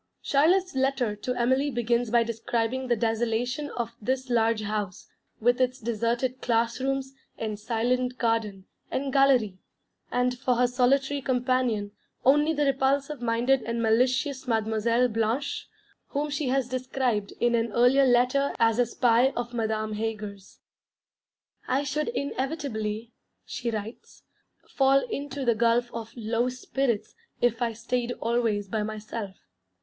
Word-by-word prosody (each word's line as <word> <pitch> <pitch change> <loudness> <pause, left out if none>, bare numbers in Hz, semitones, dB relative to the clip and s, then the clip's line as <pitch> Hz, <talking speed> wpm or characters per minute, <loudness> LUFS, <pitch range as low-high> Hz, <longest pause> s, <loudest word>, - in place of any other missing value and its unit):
Charlotte's 355 +7 +3
letter 265 -5 0
to 250 +4 -3
Emily 260 +4 +2
begins 240 -1 0
by 235 +1 +4
describing 230 +2 -2
the 240 - +2
desolation 235 +5 -1
of 235 -3 -3
this 260 +3 -2
large 225 -2 +2
house, 205 -3 -4 0.3
with 245 +3 +2
its 255 +1 +1
deserted 235 +3 -1
class 235 0 +1
rooms, 270 0 -2 0.2
and 215 -2 -4
silent 250 +3 0
garden, 220 -5 -1 0.2
and 270 0 -2
galérie, 255 -9 +3 0.5
and 250 0 0
for 255 -2 +1
her 250 +1 +3
solitary 270 +3 +2
companion 250 -5 0 0.3
only 295 +4 +5
the 295 -2 +1
repulsive 275 +1 +1
minded 240 +3 +2
and 235 0 -2
malicious 255 +4 +1
Mademoiselle 225 +1 +2
Blanche, 225 +5 -2 0.4
whom 295 +1 -2
she 285 -1 -1
has 260 -1 +1
described 255 -4 -1
in 240 0 +2
an 230 -1 +1
earlier 250 +4 +4
letter 255 +3 +3
as 225 0 +3
a 245 - +3
spy 240 +2 +3
of 240 0 -4
Madame 220 -2 -1
Heger's. 210 -2 -5 1.1
'I 265 +3 +1
should 290 +2 -2
inevitably,' 255 - -3 0.3
she 240 - -4
writes, 220 +1 -7 0.4
'fall 270 0 +3
into 280 -1 -4
the 235 - +4
gulf 235 +2 +2
of 225 -1 -6
low 230 +2 0
spirits 255 -2 -2 0.3
if 240 0 +1
I 235 -1 0
stayed 240 +2 -2
always 230 -4 0
by 215 +2 -2
myself.... 215 -1 -5
240 Hz, 135 wpm, -27 LUFS, 225-265 Hz, 1.1 s, only